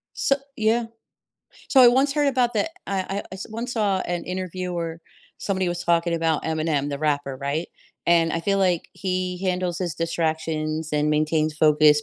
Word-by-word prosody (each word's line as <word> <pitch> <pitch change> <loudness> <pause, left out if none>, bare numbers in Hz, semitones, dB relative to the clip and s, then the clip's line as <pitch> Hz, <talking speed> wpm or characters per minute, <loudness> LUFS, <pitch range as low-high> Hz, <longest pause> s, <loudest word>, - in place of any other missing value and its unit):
So 275 - +2 0.2
Yeah. 225 +2 +2 0.8
So 270 - +6
I 245 - +10
once 270 +3 +3
heard 290 -1 +2
about 250 -3 +1
that 270 +10 0 0.2
I 195 -1 -1
I 195 +1 -2
I - - -4
s 190 - -7
once 230 +3 -4
saw 205 -5 +1
an 175 -1 -3
interview 185 0 -4
where 165 -1 -4 0.4
somebody 190 -2 -1
was 175 0 -3
talking 170 0 +2
about 165 -2 0
Eminem, 155 -3 0
the 140 - -3
rapper, 145 -3 -1
right? 140 +5 -2 0.4
And 165 -1 +4
I 165 - -1
feel 195 +3 +1
like 180 -3 +1
he 185 -1 -2
handles 180 -2 -1
his 175 -4 -2
distractions 160 -1 -2
and 150 0 +2
maintains 155 0 +1
focus 150 -1 +5
175 Hz, 180 wpm, -24 LUFS, 155-195 Hz, 0.8 s, I